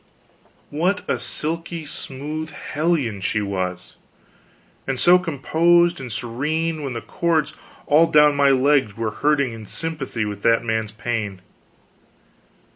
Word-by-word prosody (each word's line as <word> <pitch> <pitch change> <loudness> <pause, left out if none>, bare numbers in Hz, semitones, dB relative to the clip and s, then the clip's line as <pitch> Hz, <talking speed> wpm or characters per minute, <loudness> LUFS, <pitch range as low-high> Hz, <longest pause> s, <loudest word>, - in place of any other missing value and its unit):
What 175 +7 0
a - - 0
silky 165 +1 -3
smooth 150 +3 -5
hellion 145 - -2
she 100 +3 0
was; 95 -3 -4 0.9
and 130 -1 -1
so 180 +1 +6
composed 170 +2 +2
and 125 -2 -7
serene, 155 +8 -2
when 135 -3 -4
the 115 - -4
cords 165 -3 0 0.3
all 155 +3 +5
down 150 -2 +5
my 140 -1 +4
legs 135 -5 +2
were 115 -1 -2
hurting 140 -3 +1
in 110 -2 -9
sympathy 145 -8 -3
with 105 -1 -5
that 115 +1 +3
man's 110 -2 -2
pain. 110 -4 -4
140 Hz, 125 wpm, -22 LUFS, 115-160 Hz, 0.9 s, so